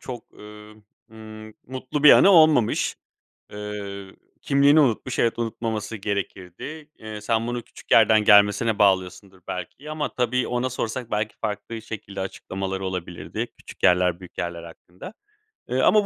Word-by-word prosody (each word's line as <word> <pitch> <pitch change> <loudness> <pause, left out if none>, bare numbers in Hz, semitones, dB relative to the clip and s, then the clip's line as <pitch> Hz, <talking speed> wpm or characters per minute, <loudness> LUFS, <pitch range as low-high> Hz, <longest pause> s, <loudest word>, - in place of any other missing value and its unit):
çok, 120 -3 -8
ııı, 105 0 -13 0.4
ımm, 110 -1 -11
mutlu 130 +3 -5
bir 150 - +11
anı 200 - +7
olmamış. 155 - +4 0.6
Iıı, 100 -2 -7 0.3
kimliğini 140 +2 +4
unutmuş. 125 -1 0
Evet, 115 0 +1
unutmaması 115 -1 -3
gerekirdi. 100 - -6
Eee, 110 -1 -8
sen 115 +1 0
bunu 120 0 -3
küçük - - -17
yerden 110 -1 +5
gelmesine 105 +2 +5
bağlıyorsundur 95 -1 +1
belki 110 - -7
ama 155 -1 -3
tabii, 125 0 0
ona 125 +1 -1
sorsak 120 -1 -4
belki 105 0 -2
farklı 110 +1 -5
şekilde 105 -3 -7
açıklamaları 95 0 -5
olabilirdi; 90 -2 -5
küçük - - -14
yerler, 90 0 +3
büyük 90 - -14
yerler 85 -1 -4
hakkında. 90 - -12 0.6
Iıı, - - +1
ama 210 -2 +5
110 Hz, 140 wpm, -24 LUFS, 95-120 Hz, 0.6 s, bir